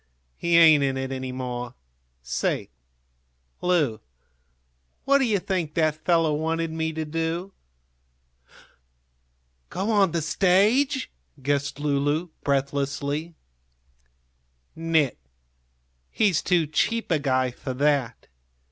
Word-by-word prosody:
"He 170 Hz, 0 st, +2 dB
ain't 155 Hz, -4 st, +7 dB
in 135 Hz, -1 st, 0 dB
it 130 Hz, 0 st, -3 dB
any 130 Hz, -1 st, -4 dB
more. 125 Hz, -1 st, -5 dB, 0.5 s
Say, 60 Hz, -, -2 dB, 0.9 s
Lu, 155 Hz, -11 st, +1 dB, 1.1 s
what 280 Hz, 0 st, +4 dB
do 265 Hz, -, +2 dB
you 215 Hz, -4 st, +2 dB
think 180 Hz, -5 st, -3 dB
that 155 Hz, -1 st, 0 dB
fellow 165 Hz, -3 st, +3 dB
wanted 160 Hz, +2 st, -1 dB
me 160 Hz, 0 st, -2 dB
to 160 Hz, 0 st, -3 dB
do?" 165 Hz, +4 st, -3 dB, 2.2 s
"Go 195 Hz, +5 st, -2 dB
on 200 Hz, -5 st, +3 dB
the 165 Hz, -1 st, -1 dB
stage?" 215 Hz, -, +2 dB, 0.3 s
guessed 140 Hz, 0 st, -1 dB
Lulu, 145 Hz, +3 st, 0 dB
breathlessly. 140 Hz, +3 st, -1 dB, 1.4 s
"Nit; 160 Hz, -, +1 dB, 0.9 s
he's 200 Hz, -7 st, +2 dB
too 175 Hz, -3 st, +2 dB
cheap 205 Hz, +9 st, -1 dB
a 160 Hz, -, +3 dB
guy 130 Hz, -2 st, +1 dB
for 130 Hz, +1 st, -6 dB
that. 140 Hz, -4 st, 0 dB
155 Hz, 105 wpm, -25 LUFS, 140-175 Hz, 2.2 s, ain't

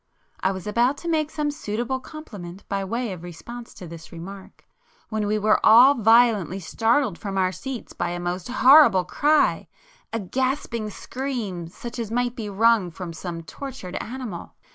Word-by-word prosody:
[p 190 Hz, -, +2 dB
160]I -, -, 0 dB
was 190 Hz, -, -7 dB
about 240 Hz, +6 st, +2 dB
to 340 Hz, -, -8 dB
make 310 Hz, -2 st, +1 dB
some 300 Hz, -1 st, -1 dB
suitable 240 Hz, -1 st, -3 dB
compliment 205 Hz, -, -10 dB
by 195 Hz, 0 st, -2 dB
way 230 Hz, +2 st, -2 dB
of 180 Hz, -, -9 dB
response 230 Hz, +8 st, -9 dB
to 180 Hz, -, -9 dB
this 165 Hz, -1 st, -10 dB
remark, 190 Hz, +3 st, -10 dB, 0.4 s
when 215 Hz, -2 st, -1 dB
we 210 Hz, +1 st, +1 dB
were 215 Hz, +1 st, +2 dB
all 245 Hz, +6 st, +8 dB
violently 225 Hz, -, +4 dB
startled 230 Hz, -, +1 dB
from 195 Hz, -2 st, -4 dB
our 185 Hz, -1 st, +2 dB
seats 260 Hz, +4 st, -7 dB
by 175 Hz, -, -2 dB
a 175 Hz, 0 st, -4 dB
most 175 Hz, +1 st, -3 dB
horrible 255 Hz, -, +6 dB
cry,—a 300 Hz, -, 0 dB
gasping 235 Hz, +1 st, -2 dB
scream 220 Hz, -8 st, -4 dB
such 240 Hz, +8 st, -8 dB
as 225 Hz, -3 st, -3 dB
might 245 Hz, +1 st, -1 dB
be 220 Hz, -4 st, -5 dB
wrung 215 Hz, -1 st, +3 dB
from 170 Hz, 0 st, -7 dB
some 165 Hz, 0 st, -6 dB
tortured 255 Hz, -, -8 dB
animal. 240 Hz, -8 st, -6 dB
220 Hz, 165 wpm, -24 LUFS, 185-255 Hz, 0.4 s, all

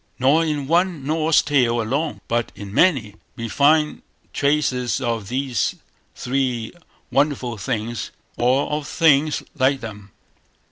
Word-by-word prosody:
Nor 140 Hz, +6 st, +3 dB
in 150 Hz, -3 st, -2 dB
one 170 Hz, -1 st, +1 dB
Norse 155 Hz, +1 st, +2 dB
tale 125 Hz, -5 st, +2 dB
alone, 140 Hz, +8 st, -2 dB
but 120 Hz, 0 st, -1 dB
in 100 Hz, -1 st, -9 dB
many, 120 Hz, -, +2 dB, 0.2 s
we 115 Hz, -, -5 dB
find 150 Hz, +4 st, +2 dB, 0.3 s
traces 140 Hz, -4 st, +1 dB
of 115 Hz, -5 st, -2 dB
these 130 Hz, +1 st, -1 dB, 0.4 s
three 125 Hz, -3 st, -2 dB, 0.4 s
wonderful 135 Hz, -4 st, 0 dB
things, 115 Hz, 0 st, -3 dB, 0.3 s
or 130 Hz, +3 st, +2 dB
of 150 Hz, -2 st, -2 dB
things 155 Hz, -2 st, +3 dB
like 135 Hz, -1 st, +2 dB
them. 105 Hz, -3 st, -9 dB
135 Hz, 125 wpm, -21 LUFS, 120-150 Hz, 0.4 s, Nor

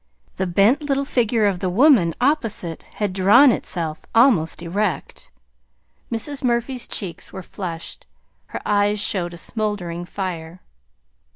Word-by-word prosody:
The 190 Hz, -, -1 dB
bent 200 Hz, -, +3 dB
little 280 Hz, -1 st, -1 dB
figure 230 Hz, -4 st, +1 dB
of 195 Hz, -3 st, +1 dB
the 185 Hz, -, -1 dB
woman 210 Hz, -, +4 dB
opposite 225 Hz, -, -1 dB
had 205 Hz, -3 st, -2 dB
drawn 210 Hz, +9 st, +6 dB
itself 160 Hz, -7 st, -3 dB
almost 215 Hz, -, +3 dB
erect. 180 Hz, -2 st, -3 dB, 0.8 s
Mrs. 270 Hz, +5 st, -3 dB
Murphy's 240 Hz, 0 st, -1 dB
cheeks 180 Hz, -6 st, -2 dB
were 190 Hz, -, -8 dB
flushed. 170 Hz, -3 st, -7 dB, 0.4 s
Her -, -, -6 dB
eyes 205 Hz, 0 st, +2 dB
showed 175 Hz, -4 st, 0 dB
a -, -, -10 dB
smouldering 180 Hz, -4 st, -3 dB
fire. 175 Hz, -2 st, -6 dB
205 Hz, 125 wpm, -21 LUFS, 175-235 Hz, 0.8 s, drawn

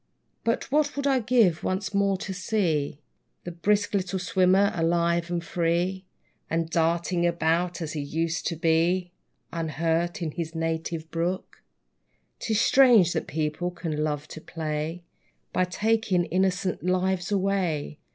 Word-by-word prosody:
But, 230 Hz, +3 st, -1 dB
what 295 Hz, 0 st, +2 dB
would 280 Hz, 0 st, -2 dB
I 270 Hz, -2 st, +3 dB
give, 215 Hz, -8 st, +3 dB
once 190 Hz, +2 st, -2 dB
more 200 Hz, -1 st, +2 dB
to 195 Hz, 0 st, -5 dB
see 175 Hz, -8 st, 0 dB, 0.5 s
The 175 Hz, -, -5 dB
brisk 205 Hz, +5 st, +1 dB
little 190 Hz, -1 st, 0 dB
swimmer 185 Hz, +2 st, +3 dB
alive 170 Hz, 0 st, +1 dB
and 175 Hz, -1 st, -2 dB
free, 175 Hz, +3 st, 0 dB, 0.4 s
And 165 Hz, 0 st, -1 dB
darting 170 Hz, +2 st, +1 dB
about 170 Hz, +1 st, 0 dB
as 155 Hz, -, -5 dB
he 155 Hz, -, -3 dB
used 160 Hz, +3 st, -2 dB
to 170 Hz, -, -1 dB
be, 170 Hz, +3 st, +1 dB, 0.4 s
Unhurt, 165 Hz, +1 st, -1 dB
in 160 Hz, -, -2 dB
his 165 Hz, +1 st, -5 dB
native 160 Hz, 0 st, -3 dB
brook! 175 Hz, +3 st, -3 dB, 0.8 s
'Tis 220 Hz, -2 st, 0 dB
strange 235 Hz, -9 st, +6 dB
that -, -, -2 dB
people 155 Hz, +3 st, -2 dB
can 170 Hz, -3 st, -4 dB
love 150 Hz, -1 st, -2 dB
to 160 Hz, -, -9 dB
play, 160 Hz, +1 st, -4 dB, 0.5 s
By 185 Hz, -, +2 dB
taking 200 Hz, -1 st, +1 dB
innocent 185 Hz, 0 st, 0 dB
lives 185 Hz, +1 st, 0 dB
away! 185 Hz, -7 st, 0 dB
175 Hz, 140 wpm, -26 LUFS, 165-190 Hz, 0.8 s, strange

